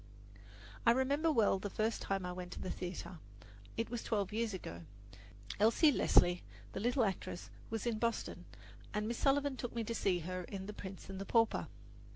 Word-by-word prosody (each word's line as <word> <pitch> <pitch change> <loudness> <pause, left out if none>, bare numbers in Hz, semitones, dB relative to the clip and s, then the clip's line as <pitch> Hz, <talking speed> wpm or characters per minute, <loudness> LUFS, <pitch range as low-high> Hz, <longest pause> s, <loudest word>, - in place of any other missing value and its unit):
I 230 - +5
remember 280 +5 +2
well 215 -8 +4
the 205 - -3
first 220 +3 0
time 195 -2 -1
I 180 - -2
went 180 0 -6
to - - -7
the - - -3
theatre. 180 -1 -5 0.6
It 230 0 -1
was 240 -2 -2
twelve 205 -2 -1
years 225 0 0
ago. 85 - -6 0.8
Elsie 230 +9 +6
Leslie, 175 -8 +5 0.3
the - - -3
little 240 +3 +3
actress, 190 -2 -3 0.2
was 225 0 -2
in 230 -2 0
Boston, 230 0 -1 0.5
and 210 0 0
Miss 235 0 -2
Sullivan 280 -1 +2
took 245 -1 -4
me 230 - 0
to 230 - -3
see 195 -4 +2
her 185 +2 -3
in 190 0 -6
"The 210 - -6
Prince 190 -2 -8
and 195 0 -6
the - - -4
Pauper." 230 -1 +3
215 Hz, 190 wpm, -36 LUFS, 190-235 Hz, 0.8 s, Elsie